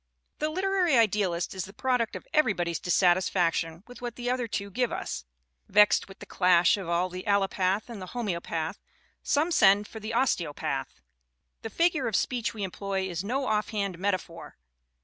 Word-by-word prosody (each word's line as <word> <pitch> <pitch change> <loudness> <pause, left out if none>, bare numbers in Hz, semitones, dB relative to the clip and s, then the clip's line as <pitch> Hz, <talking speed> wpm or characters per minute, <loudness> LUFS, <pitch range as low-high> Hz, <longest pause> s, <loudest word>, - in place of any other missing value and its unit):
The 305 - 0
literary 370 -3 +2
idealist 200 -6 +1
is 190 -2 -4
the 195 - -13
product 250 -1 0
of - - -8
everybody's 180 - +1
dissatisfaction 175 -2 +1
with 245 0 -13
what 240 -1 -5
the 245 0 -2
other 250 -2 -1
two 200 -2 -4
give 250 +4 0
us. - - -4 0.4
Vexed 210 +1 +4
with 195 - -13
the - - -11
clash 180 -2 +4
of 195 -4 -6 0.2
the 185 +1 -6
allopath 195 0 +1
and 230 -5 -8
the 185 - -7
homeo 205 -8 -3
path, 160 -1 -4 0.4
some 310 +4 +1
send 205 - +5
for 220 - -9
the 220 +2 -5
osteopath. 175 - -1 0.6
The 225 - -5
figure 335 - +1
of 220 - -1
speech 245 +1 0
we 215 -3 -6
employ 190 0 -3
is 175 -1 -4
no 260 +6 -1
offhand 210 -4 -1
metaphor. 185 -3 -3
200 Hz, 170 wpm, -28 LUFS, 185-240 Hz, 0.6 s, send